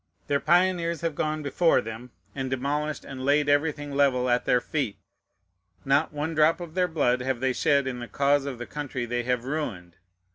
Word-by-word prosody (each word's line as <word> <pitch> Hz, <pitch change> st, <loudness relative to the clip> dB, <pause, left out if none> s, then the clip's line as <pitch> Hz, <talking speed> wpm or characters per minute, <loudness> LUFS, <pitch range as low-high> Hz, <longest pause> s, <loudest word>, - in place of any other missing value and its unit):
Their 140 Hz, -1 st, +1 dB
pioneers 170 Hz, -1 st, +2 dB
have 165 Hz, -2 st, -1 dB
gone 155 Hz, +1 st, -2 dB
before 165 Hz, +4 st, +3 dB
them, 115 Hz, +3 st, -7 dB, 0.2 s
and 135 Hz, -1 st, -3 dB
demolished 145 Hz, +4 st, -2 dB
and 130 Hz, -1 st, -7 dB
laid 145 Hz, +2 st, +3 dB
everything 145 Hz, 0 st, +1 dB
level 130 Hz, -3 st, +2 dB
at 120 Hz, -, +1 dB
their 125 Hz, -, +3 dB
feet. 130 Hz, -5 st, -3 dB, 0.9 s
Not 140 Hz, +3 st, +2 dB
one 150 Hz, +2 st, -3 dB
drop 155 Hz, +2 st, +3 dB
of 170 Hz, -3 st, -8 dB
their 180 Hz, 0 st, +2 dB
blood 140 Hz, -7 st, +1 dB
have 130 Hz, -1 st, -1 dB
they 130 Hz, 0 st, +1 dB
shed 140 Hz, +3 st, +2 dB
in 125 Hz, -2 st, -4 dB
the 120 Hz, -, -6 dB
cause 140 Hz, +1 st, +2 dB
of 135 Hz, -3 st, -4 dB
the 120 Hz, -, -6 dB
country 140 Hz, -4 st, -4 dB
they 120 Hz, +1 st, -1 dB
have 125 Hz, 0 st, -1 dB
ruined. 100 Hz, -, -4 dB
140 Hz, 190 wpm, -26 LUFS, 125-155 Hz, 0.9 s, before